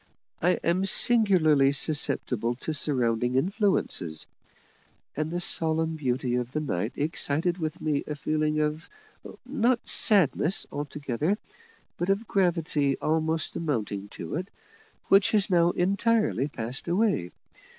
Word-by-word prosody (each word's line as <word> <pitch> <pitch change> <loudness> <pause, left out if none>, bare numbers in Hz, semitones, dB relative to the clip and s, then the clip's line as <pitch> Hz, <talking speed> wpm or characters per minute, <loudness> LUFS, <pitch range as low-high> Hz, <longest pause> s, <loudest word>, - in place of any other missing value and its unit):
I 180 +2 +3
am 175 +3 +1
singularly 185 -11 +5
susceptible 130 -5 0
to 160 - -3
surrounding 125 -4 0
influences; 180 - 0 0.9
and 155 +2 -2
the 175 +2 -3
solemn 160 -1 -1
beauty 130 -4 -2
of 125 +1 -4
the 155 - -1
night 110 -7 -3
excited 160 +3 -1
within 160 0 -5
me 150 -2 0
a 150 - -4
feeling 155 +1 -1
of 150 +1 -3 0.6
not 250 -2 0
sadness 190 - +3
altogether, 145 - -2 0.6
but 175 - -2
of 200 +3 0
gravity 165 -7 0
almost 160 0 -1
amounting 110 -10 -3
to 125 - -6
it, 180 +2 -5 0.6
which 195 0 +5
has 205 -2 +2
now 170 -1 +4
entirely 200 - +1
passed 125 0 -4
away. 185 - 0
155 Hz, 120 wpm, -26 LUFS, 140-185 Hz, 0.9 s, singularly